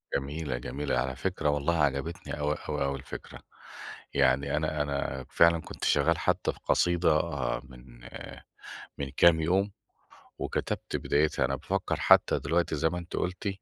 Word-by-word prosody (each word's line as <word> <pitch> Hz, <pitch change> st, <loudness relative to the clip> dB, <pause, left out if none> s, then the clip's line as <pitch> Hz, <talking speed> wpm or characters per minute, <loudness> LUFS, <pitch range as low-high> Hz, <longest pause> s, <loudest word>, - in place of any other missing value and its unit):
جميلة، 70 Hz, -1 st, -2 dB
جميلة. 70 Hz, +2 st, -2 dB
على 65 Hz, +1 st, -1 dB
فكرة 80 Hz, +1 st, -1 dB
والله 75 Hz, +3 st, +1 dB
عجبتني 70 Hz, +5 st, -2 dB
أوي 75 Hz, +1 st, 0 dB
أوي -, -, 0 dB
أوي 70 Hz, 0 st, -1 dB
الفكرة. 70 Hz, -, -9 dB, 0.7 s
يعني 70 Hz, +1 st, +2 dB
أنا 75 Hz, -1 st, -1 dB
أنا 70 Hz, -2 st, -2 dB
فعلًا 85 Hz, 0 st, +4 dB
كنت -, -, -10 dB
شغال -, -, +3 dB
حتى -, -, 0 dB
القصيدة 85 Hz, -3 st, +2 dB, 0.4 s
من 60 Hz, -1 st, -15 dB, 1.0 s
من 70 Hz, -1 st, -3 dB
كام 85 Hz, -2 st, +6 dB
يوم، 95 Hz, +5 st, +1 dB, 0.7 s
وكتبت -, -, -3 dB
بدايتها. 75 Hz, +1 st, +1 dB
أنا -, -, -1 dB
بافكّر -, -, -2 dB
حتى -, -, +5 dB
دلوقتي 85 Hz, -1 st, 0 dB
زي 80 Hz, +2 st, +2 dB
ما 90 Hz, -, -4 dB
أنتِ 85 Hz, 0 st, -7 dB
قُلتِ 90 Hz, +3 st, -2 dB
75 Hz, 140 wpm, -29 LUFS, 70-85 Hz, 1.0 s, كام